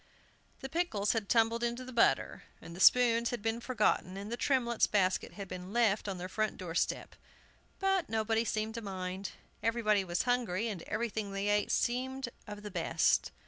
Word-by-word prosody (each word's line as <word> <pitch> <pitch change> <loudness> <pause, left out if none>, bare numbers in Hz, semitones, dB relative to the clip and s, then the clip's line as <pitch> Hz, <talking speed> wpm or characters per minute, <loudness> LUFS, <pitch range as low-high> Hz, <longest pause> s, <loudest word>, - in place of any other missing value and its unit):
The 265 - -4
pickles 265 - 0
had 220 -4 -2
tumbled 230 0 +3
into 240 +2 -2
the 255 - -9
butter, 235 - +2 0.2
and 165 +1 -10
the - - -9
spoons 235 +2 +5
had 240 -4 -4
been 225 +1 -1
forgotten, 210 -6 0
and 200 +2 -6
the - - -1
Tremletts' 240 -3 +1
basket 190 -3 +1
had 200 -2 -7
been 185 +1 -7
left 220 -4 +2
on 195 -2 -3
their 180 +1 -5
front 215 +3 -1
door 175 -3 -6
step. - - -1 0.6
But 385 -2 +1
nobody 225 +1 +1
seemed 220 -1 -2
to 230 - -5
mind. 190 -1 -5 0.3
Everybody 220 -3 +2
was 175 -1 -1
hungry, 235 -4 0
and 195 -6 -5
everything 215 -2 -2
they 195 +1 -1
ate 205 0 +2
seemed 260 +1 -1 0.2
of 210 0 -8
the 210 - -6
best. - - +2
220 Hz, 185 wpm, -32 LUFS, 195-235 Hz, 0.6 s, spoons